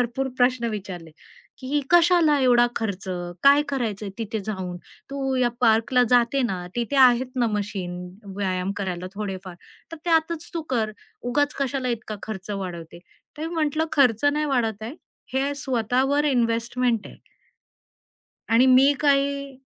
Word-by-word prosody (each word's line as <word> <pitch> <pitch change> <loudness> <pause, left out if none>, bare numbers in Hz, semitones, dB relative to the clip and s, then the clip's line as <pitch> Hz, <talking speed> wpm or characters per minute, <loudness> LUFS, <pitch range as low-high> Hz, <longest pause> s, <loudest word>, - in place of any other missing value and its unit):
भरपूर 245 +2 -1
प्रश्न 250 -1 +2
विचारले, 185 -6 -7 0.5
की 280 +3 -1
"कशाला 340 -3 +5
एवढा 245 -2 +5
खर्च? 200 -4 -3 0.4
काय 280 +1 +6
करायचंय 220 -7 -2
तिथे 220 0 -3
जाऊन, 190 -4 -4 0.3
तू 270 -1 -2
या 250 -1 +3
पार्कला 230 +2 +3
जाते 245 +2 +3
ना, 185 -6 -2
तिथे 240 +4 -1
आहेत 255 -1 +6
ना 240 - +2
मशीन 200 -4 -3 0.4
व्यायाम 185 -1 -1
करायला 185 -2 -4
थोडेफार 195 -3 -5 0.4
तर - - -5
त्यातच 325 -1 +1
तू 330 - -2
कर. 220 -2 0 0.4
उगाच 290 +3 +1
कशाला 270 -1 -1
इतका 220 -3 -4
खर्च 210 -2 -6
वाढवते?" 175 -4 -6 0.4
तर 315 - -3
मी 335 - -6
म्हटलं 310 0 0
"खर्च 255 -4 +3
नाही 295 +1 +2
वाढवताय. 225 -3 -1 0.4
हे 275 +2 0
स्वतःवर 265 +2 0
इन्व्हेस्टमेंट 235 -1 0
आहे." - - -14 1.3
आणि 235 +3 +5
मी 265 +2 +6
काही 280 -1 +1
245 Hz, 135 wpm, -24 LUFS, 210-275 Hz, 1.3 s, काय